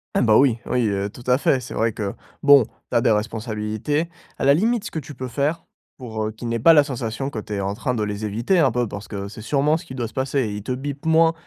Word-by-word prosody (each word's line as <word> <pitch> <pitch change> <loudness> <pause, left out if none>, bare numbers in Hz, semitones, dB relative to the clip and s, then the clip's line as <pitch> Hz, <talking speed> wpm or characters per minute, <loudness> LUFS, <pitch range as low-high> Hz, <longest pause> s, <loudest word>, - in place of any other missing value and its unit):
Eh - - +3
bah, 110 -3 +5
oui, 125 -4 +4
oui, 125 -3 +1
heu, 100 0 -1
tout 120 +4 -13
à 125 +2 +3
fait, 135 - +2
c'est - - -8
vrai 115 +1 +1
que, 100 -2 -4 0.3
bon, 140 -5 +7
tu - - -11
as 120 - +5
des - - +3
responsabilités. 110 +7 -1 0.3
À - - -1
la 140 - +7
limite 220 +6 +1
ce - - -6
que 160 - -3
tu 145 0 -10
peux 130 +1 -5
faire, 145 +6 -1 0.3
pour, 110 -4 -4
heu, 110 - -2
qu'ils 115 +2 -6
n'aient 115 - -1
pas 165 +9 +7
la 150 -2 +7
sensation 130 0 -4
que 115 - -4
tu 105 0 -7
es 100 - -1
en 100 +1 -1
train 125 +4 -2
de 110 - -1
les 105 0 -4
éviter, 115 - +1
un 140 -5 +5
peu, 120 +1 0
parce 100 0 -7
que, 100 -1 -5
c'est 105 +2 -10
sûrement 145 +6 +2
ce 165 +2 -5
qui 130 - -9
doit 120 -3 -2
se - - -15
passer. 135 +1 0
Et 110 -4 -2
ils 105 - -5
te 110 - -5
bipent 140 +3 -4
moins, 165 0 +5
120 Hz, 290 wpm, -22 LUFS, 110-140 Hz, 0.3 s, bon